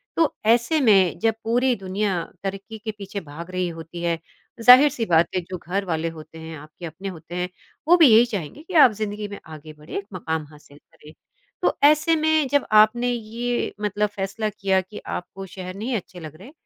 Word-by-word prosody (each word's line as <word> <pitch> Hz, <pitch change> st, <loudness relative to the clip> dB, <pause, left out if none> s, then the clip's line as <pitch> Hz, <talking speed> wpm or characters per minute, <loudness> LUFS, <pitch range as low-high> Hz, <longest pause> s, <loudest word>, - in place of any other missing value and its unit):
तो 325 Hz, -3 st, +2 dB
ऐसे 240 Hz, +8 st, +3 dB
में 195 Hz, -7 st, +4 dB
जब 225 Hz, 0 st, +2 dB
पूरी 245 Hz, +3 st, +2 dB
दुनिया 195 Hz, -2 st, -2 dB, 0.2 s
तरक्की 195 Hz, +3 st, -6 dB
के 220 Hz, +1 st, -5 dB
पीछे 200 Hz, 0 st, -6 dB
भाग 165 Hz, +3 st, -10 dB
रही 185 Hz, 0 st, -1 dB
होती 165 Hz, +1 st, -9 dB
है, 170 Hz, -1 st, 0 dB, 0.4 s
ज़ाहिर-सी 250 Hz, +1 st, +7 dB
बात 170 Hz, -3 st, +3 dB
है, 185 Hz, -, +1 dB
जो 185 Hz, +1 st, -7 dB
घरवाले 175 Hz, -3 st, -2 dB
होते 155 Hz, +1 st, -12 dB
हैं 160 Hz, 0 st, -8 dB
आपके 155 Hz, +4 st, -11 dB
अपने 170 Hz, +4 st, -8 dB
होते 170 Hz, -1 st, -10 dB
हैं, 180 Hz, 0 st, -2 dB, 0.4 s
वो 350 Hz, +2 st, +7 dB
भी 325 Hz, -4 st, +7 dB
यही 225 Hz, +2 st, +7 dB
चाहेंगे 205 Hz, -, -6 dB
कि 365 Hz, -, -11 dB
आप 295 Hz, -7 st, +7 dB
ज़िंदगी 210 Hz, 0 st, -3 dB
में 200 Hz, 0 st, -9 dB
आगे 155 Hz, -1 st, -11 dB
बढ़ें, 150 Hz, +5 st, -6 dB
मकाम 160 Hz, -3 st, -3 dB
हासिल 150 Hz, -1 st, -17 dB
करें। 150 Hz, +1 st, -18 dB, 0.5 s
तो -, -, +1 dB
ऐसे 305 Hz, +3 st, +5 dB
में 315 Hz, -2 st, +2 dB
जब 285 Hz, -1 st, +2 dB, 0.2 s
आपने 240 Hz, +3 st, -1 dB
ये 240 Hz, +1 st, -3 dB
मतलब 210 Hz, 0 st, 0 dB
फ़ैसला 200 Hz, +2 st, -3 dB
किया 195 Hz, -2 st, 0 dB
कि 195 Hz, +3 st, -11 dB
आपको 195 Hz, +2 st, -6 dB
शहर 185 Hz, -1 st, -7 dB
नहीं 230 Hz, +5 st, -3 dB
अच्छे 185 Hz, -3 st, -6 dB
लग 155 Hz, -2 st, -9 dB
रहे, 195 Hz, -, -13 dB
195 Hz, 190 wpm, -23 LUFS, 170-235 Hz, 0.5 s, ज़ाहिर-सी